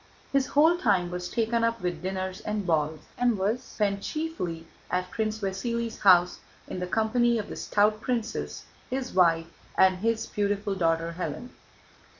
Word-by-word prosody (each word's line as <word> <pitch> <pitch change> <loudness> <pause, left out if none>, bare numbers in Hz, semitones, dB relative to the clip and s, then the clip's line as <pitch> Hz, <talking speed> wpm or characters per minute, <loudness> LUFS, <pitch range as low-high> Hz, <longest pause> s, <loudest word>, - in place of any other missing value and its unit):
His 275 -1 +2
whole 320 +4 +4
time 180 - +2
was 180 0 -4
taken 230 0 0
up 230 0 +1
with 175 -4 -3
dinners 190 0 -3
and 210 -2 -3
balls 155 -2 0 0.2
and 245 -3 +3
was 210 +6 0
spent 200 -5 -1
chiefly 250 - -4 0.2
at 180 0 -1
Prince 220 -1 -1
Vasíli's 230 +4 -2
house 180 -2 +5 0.3
in - - -5
the 180 - -3
company 230 +4 +2
of 210 - -4
the - - -6
stout 210 +1 +2
princess, 235 -2 -3 0.2
his 260 0 -3
wife, 165 -3 +4 0.3
and 185 -1 +5
his 225 +3 0
beautiful 205 0 -1
daughter 165 -2 0
Hélène. 175 +9 -4
205 Hz, 160 wpm, -27 LUFS, 180-230 Hz, 0.3 s, house